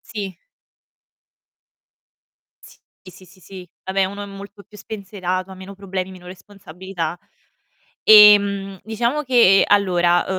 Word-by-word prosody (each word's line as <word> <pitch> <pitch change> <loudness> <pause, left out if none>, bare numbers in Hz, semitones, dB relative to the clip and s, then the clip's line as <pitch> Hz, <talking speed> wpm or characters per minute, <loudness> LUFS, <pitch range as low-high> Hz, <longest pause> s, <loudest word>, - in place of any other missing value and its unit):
Sì. 200 -4 -8 2.3
Sì, - - -17 0.3
sì, 185 - -12
sì, 185 - -17
sì, 185 +1 -21
sì. 185 -1 -13 0.2
Vabbè, 190 0 -1
uno 200 +2 -6
è - - -8
molto 200 +1 -12
più 210 0 -18
spensierato, 190 -3 -6
ha 190 - -10
meno 190 +1 -12
problemi, 190 -1 -6
meno 180 -1 -15
responsabilità. 180 -2 -8 0.9
Ehm, 200 -2 +5
diciamo 235 +7 -2
che, 235 -7 +4
allora, 175 -3 +2
195 Hz, 120 wpm, -19 LUFS, 185-205 Hz, 2.3 s, Ehm